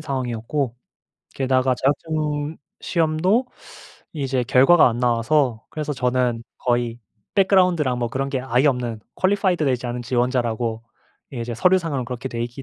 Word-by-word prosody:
상황이었고 130 -2 -3 0.6
게다가 130 -1 +2
자격증 150 +2 -1 0.2
시험도 175 +9 +1 0.7
이제 135 -4 -1
결과가 135 +7 +6
안 120 0 -3
나와서 120 0 +1
그래서 150 -1 -3
저는 125 -2 0 0.2
거의 120 -1 0 0.4
background랑 180 -9 +3
뭐 120 -1 -1
그런 135 +3 -2
게 135 -2 -2
아예 130 +2 +1
없는 125 -5 0 0.2
qualified 185 -3 +2
되지 125 -3 0
않은 120 0 -4
지원자라고 120 -2 -1 0.5
예 120 - -4
이제 120 0 -4
서류 180 +10 +4
상으로 150 -8 -3
그렇게 125 +2 -5
돼 115 -2 -4
있기 120 +3 -6
130 Hz, 385 characters per minute, -22 LUFS, 120-155 Hz, 0.7 s, 결과가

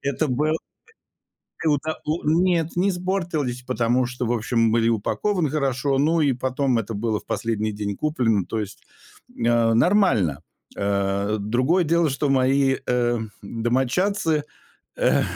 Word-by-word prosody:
Это 140 +3 -1
был 150 +5 0 1.1
это 155 0 0
у 155 +3 -2
нет, 165 +1 +1
не 185 +3 +2
испортились, 175 -9 -2
потому 125 0 +1
что, 125 0 -4
в - - 0
общем, 115 -1 +1
были 115 0 +2
упакованы 155 - 0
хорошо. 135 -2 0
Ну, 160 +3 +2
и 140 -3 +3
потом 130 0 0
это 115 +1 -5
было 110 0 -1
в - - -21
последний 110 -2 -1
день 100 -1 -4
куплено. 115 - 0
То 110 - -3
есть, 105 -2 -7 0.5
э, 115 -1 +2
нормально. 115 - +3 0.3
Э, 100 +1 0
другое 130 - +1
дело, 165 0 +2
что 140 +1 -1
мои, 135 0 +3
э, 120 -1 +1 0.2
домочадцы, 130 - 0 0.5
э, - - +2
130 Hz, 135 wpm, -23 LUFS, 115-155 Hz, 1.1 s, и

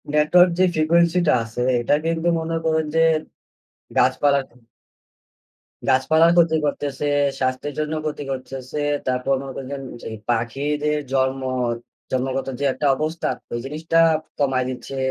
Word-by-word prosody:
Network 165 +4 +5
যে - - +5
frequency 170 +2 +3
টা - - +5
আছে, 115 +2 -5 0.2
এটা 120 - +1
কিন্তু 165 +1 0
মনে 165 0 -3
করুন 160 -1 +1
যে, - - +4 1.0
গাছপালার 140 -1 +3
ক্ষে 120 - -24 1.3
গাছপালার 160 +6 +4
ক্ষতি 165 -2 +4
করতেছে, 145 0 -2 0.3
স্বাস্থ্যের 130 +2 -1
জন্য 155 0 -2
ক্ষতি 150 -1 -3
করতেছে। 130 +2 -5 0.3
তারপর 130 +1 0
মনে 135 -1 -7
করছেন 135 0 -6 0.2
যে, - - -5 0.2
পাখিদের 145 +6 0
জন্ম 130 0 +1 0.7
জন্মগত 130 +1 -1
যে 140 - 0
একটা 145 - -1
অবস্থা, 155 +4 -2 0.2
ওই 120 - -1
জিনিসটা 160 +4 0 0.4
কমায় 130 -3 +1
দিচ্ছে। 130 +1 -6
145 Hz, 130 wpm, -22 LUFS, 130-160 Hz, 1.3 s, Network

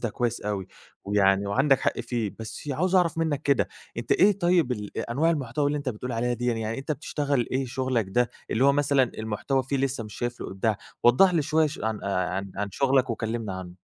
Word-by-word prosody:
ده 115 - -2
كويس 120 +1 -1
أوي 100 -3 -3 0.4
ويعني 100 -1 +3
وعندك 135 +6 +3
حق - - 0
فيه، 115 -4 -3
بس 110 +6 -7
عاوز 180 +7 0
أعرف 170 -3 +3
منك 155 -3 0
كده 140 -2 +2 0.3
أنت 115 0 -1
إيه 200 +1 +4
طيب 175 -7 +3
ال 105 -4 -6
أ - - -4
أنواع 160 +6 +2
المحتوى 145 -2 -1
اللي 145 +1 0
أنت 140 - -4
بتقول 125 +1 -4
عليها 120 +2 0
ديًّا 120 0 -1
يعني 115 -1 0
يعني 110 +3 -3
أنت 155 +3 -2
بتشتغل 140 -3 -1
إيه 130 +1 0
شغلك 130 -2 0
ده 120 +4 +1 0.2
اللي 125 - +2
هو 140 - +6
مثلًا 140 -1 +3 0.2
المحتوى 110 +5 -1
فيه 135 +2 -2
لسه 130 -3 -1
مش 105 - -10
شايف 120 0 -4
له - - -4
إبداع؟ 100 +2 0 0.3
وضّح 175 +10 +6
لي 160 - +3
شوية 155 +2 +2
ش 150 - -6
عن 110 -1 -2
آآ 95 0 -1
عن 100 0 -2
شغلك 135 +3 +2
وكلمني 110 -2 -3
عنه. 95 -1 -7
125 Hz, 220 wpm, -26 LUFS, 110-140 Hz, 0.4 s, هو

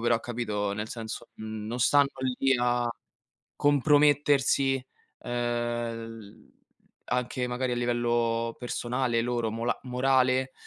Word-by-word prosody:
però, 120 0 +2
capito, 105 -4 -2
nel 105 +1 -4
senso, 115 -2 -6
non 110 +2 -5
stanno 140 +3 +4 0.3
lì 135 0 +3
a 120 0 +1 0.7
compromettersi, 145 -2 +3 0.4
uhm, - - -8
l 120 -2 -3 0.6
anche 125 0 -1
magari 125 +1 -1
a - - -1
livello 120 -1 0
personale 120 0 -1
loro 120 -2 -1
mola 115 +2 -2
morale, 130 0 +2
120 Hz, 105 wpm, -28 LUFS, 115-130 Hz, 0.7 s, stanno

